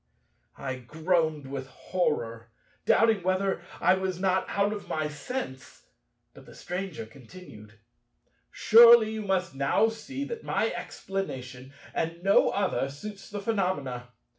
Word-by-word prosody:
I 130 -1 -4
groaned 155 +2 0
with 135 0 -6
horror, 115 -8 -2 0.4
doubting 225 -3 +4
whether 185 0 0 0.2
I - - +4
was 190 -1 -2
not 190 0 +1
out 200 +1 +1
of 205 - -7
my 155 -1 -1
sense; 150 - -6 0.5
but - - -15
the - - -14
Stranger 180 - -5
continued: 115 - -14 0.7
"Surely 230 -1 +7
you 220 0 -4
must 190 -5 -1
now 140 +11 +2
see 265 +5 -6
that 465 +5 -6
my - - 0
explanation, 130 -9 -6 0.2
and 165 +1 -3
no 195 +1 +5
other, 190 -8 0
suits 195 +9 -9
the 205 -1 -5
phenomena. 180 - -2
180 Hz, 130 wpm, -28 LUFS, 135-200 Hz, 0.7 s, Surely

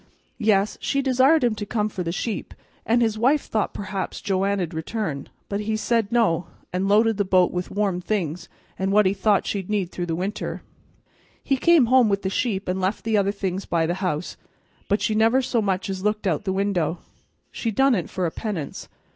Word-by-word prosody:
Yes, 210 -2 +2
she 275 0 0
desired 265 +4 +4
him 240 -2 +3
to 210 - -5
come 210 0 -1
for 195 -3 -5
the 170 -1 -2
sheep; 210 +4 -4 0.3
an' 235 +2 +3
his 220 -2 +1
wife 270 +5 +3
thought 215 -2 -1
perhaps 195 -1 -4
Joanna'd 195 -2 -1
return, 160 -3 -4 0.2
but 200 - -2
he 215 +1 -1
said 225 -1 0
no, 180 -8 +2 0.3
an' 185 +2 0
lo'ded 220 +1 +4
the 205 - +2
bo't 185 -2 +3
with 180 0 -3
warm 195 -3 -1
things 175 -4 -2 0.3
an' 190 +1 0
what 210 +1 +4
he 190 - +3
thought 205 0 +2
she'd 195 -2 -3
need 200 -4 -1
through 175 -1 -4
the 165 - -1
winter. 190 +5 -4 0.8
He 275 - +1
come 330 0 +5
home 250 -1 +5
with 200 0 0
the 190 - -1
sheep 205 -3 -1
an' 180 +1 -1
left 190 +3 -1
the 225 -1 0
other 200 -1 +2
things 195 -1 -3
by 165 -1 +1
the 170 - 0
house, 175 -3 -2 0.5
but 205 - +1
she 220 - +1
never 225 +4 +4
so 250 -3 0
much 190 -2 -1
as 190 -1 -4
looked 210 0 0
out 165 -6 +1
o' - - -27
the 190 - 0
window. 190 -4 0 0.5
She 230 - -3
done 270 +5 +3
it 180 -8 -1
for 185 - -2
a 165 - -1
penance. 185 -10 -5
200 Hz, 210 wpm, -24 LUFS, 185-220 Hz, 0.8 s, come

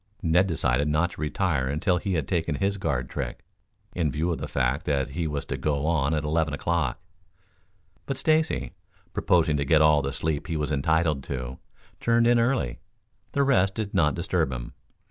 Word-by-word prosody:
Ned 90 +3 +3
decided 75 -5 +1
not 80 +4 +1
to - - -9
retire 75 -4 0
until 75 +6 +1
he 95 +1 -2
had 80 -5 -1
taken 80 -4 0
his 100 +7 0
guard 65 -10 -1
trick, - - -5 0.5
in 80 -5 0
view 80 +5 -1
of 85 - -2
the - - -4
fact 65 +5 -1
that 70 -3 0
he 85 +2 -2
was 75 -2 -3
to - - -4
go 75 -1 -1
on 80 -2 +1
at 75 - -1
eleven 80 -1 0
o'clock. 85 +2 -1 1.1
But 135 - -2
Stacy, 155 - +1 0.4
proposing 80 -4 +2
to 70 - 0
get 75 +2 +4
all 75 -1 +5
the 70 0 -2
sleep 75 +1 -2
he 80 -3 -2
was 75 0 -2
entitled 75 0 +1
to, 65 -1 -5 0.4
turned 115 0 +3
in 120 0 +5
early. 115 - 0 0.5
The 140 - +3
rest 100 -9 +3
did 105 -2 -3
not 75 -3 +3
disturb - - 0
him. - - -6
80 Hz, 185 wpm, -26 LUFS, 70-90 Hz, 1.1 s, all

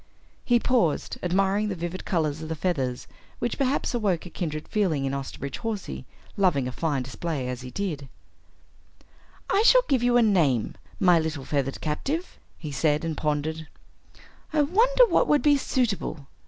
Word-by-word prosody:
He 240 -1 +3
paused, 230 - 0
admiring 195 +3 +1
the 195 - -2
vivid 175 +2 -5
colors 155 -4 -1
of 160 - -6
the 160 - -2
feathers 135 -8 -2 0.3
which 240 +3 -3
perhaps 270 0 0
awoke 200 -8 0
a 180 - -9
kindred 155 -4 -4
feeling 170 -10 0
in 135 - -1
Osterbridge 140 0 -5
Hawsey, 200 - -4 0.3
loving 170 -10 +2
a - - -3
fine 140 -1 -1
display 135 +1 -4
as 125 0 -4
he 125 - -8
did. 145 -3 -4 1.4
"I 395 - +3
shall - - +6
give 265 -4 +2
you 245 0 +3
a 240 - +5
name, 155 - +2 0.3
my 180 -3 +5
little 160 -4 -3
feathered 135 -2 -2
captive," 280 - -3 0.2
he 155 -3 -7
said, 150 +2 +1
and 160 -1 -2
pondered. 155 +1 -2 0.8
"I 305 -1 +3
wonder 470 +11 +4
what - - +2
would 295 - +3
be 295 -2 +5
suitable? 220 - -1
170 Hz, 165 wpm, -26 LUFS, 145-230 Hz, 1.4 s, shall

